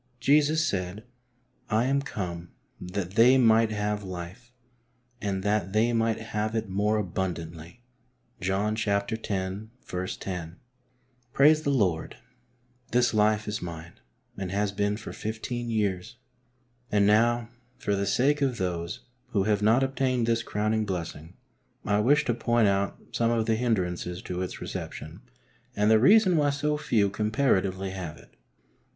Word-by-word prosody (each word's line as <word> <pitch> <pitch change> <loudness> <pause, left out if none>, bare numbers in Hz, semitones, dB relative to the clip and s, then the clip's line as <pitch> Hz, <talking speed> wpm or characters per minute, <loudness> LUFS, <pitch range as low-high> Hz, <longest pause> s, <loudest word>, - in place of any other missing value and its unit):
Jesus 150 +3 +3
said: 95 -4 -3 0.3
" 125 - -40
I - - +3
am 140 +1 +2
come 90 -9 -5 0.3
that 90 0 -4
they 120 +6 +6
might 115 -2 +5
have 105 -1 -2
life, 95 +6 -8 0.7
and 95 -2 -2
that/ 105 -2 0
they 115 +3 +3
might 115 -1 +1
have 110 0 -3
it 110 -1 -1
more 105 +3 +1
abundantly" 85 +1 -4 0.6
{John 100 +3 0
x. - - -7 0.2
lo). 100 -2 -3 1.7
Praise 155 +3 +5
the 150 - -1
Lord, 95 - 0 0.7
this 120 -1 +3
life 110 0 +2
is 105 0 -3
mine, 85 -1 -8 0.4
and 95 -2 -4
has 100 +1 0
been 105 +1 -1
for 110 - -8
fifteen 120 +2 -4
years. 105 0 -1 0.8
And 100 -1 +3
now, 115 +3 +3 0.3
for 100 - -1
the 100 0 -1
sake 145 +8 +2
of 130 -4 +1
those 85 -2 -3 0.3
who 100 -3 +2
have 105 0 +1
not 115 +5 +4
obtained 130 -2 0
this 115 0 +1
crowning 110 0 0
blessing, 85 -3 -5 0.5
I 105 0 +2
wish 145 +7 +3
to 120 - +1
point 120 -1 +2
out 100 0 0
some 115 -1 +1
of 115 -1 +1
the 115 - +2
hindrances 90 -6 -1
to 90 0 -4
its 90 - -5
reception - - -7 0.5
and 105 +1 +3
the 110 - +6
reason 185 - +5
why 145 -1 +3
so 145 +1 0
few 115 -10 +1
comparatively 100 -4 0
have 90 -5 -6
it. - - -17
I. - - -31
105 Hz, 145 wpm, -27 LUFS, 95-120 Hz, 1.7 s, they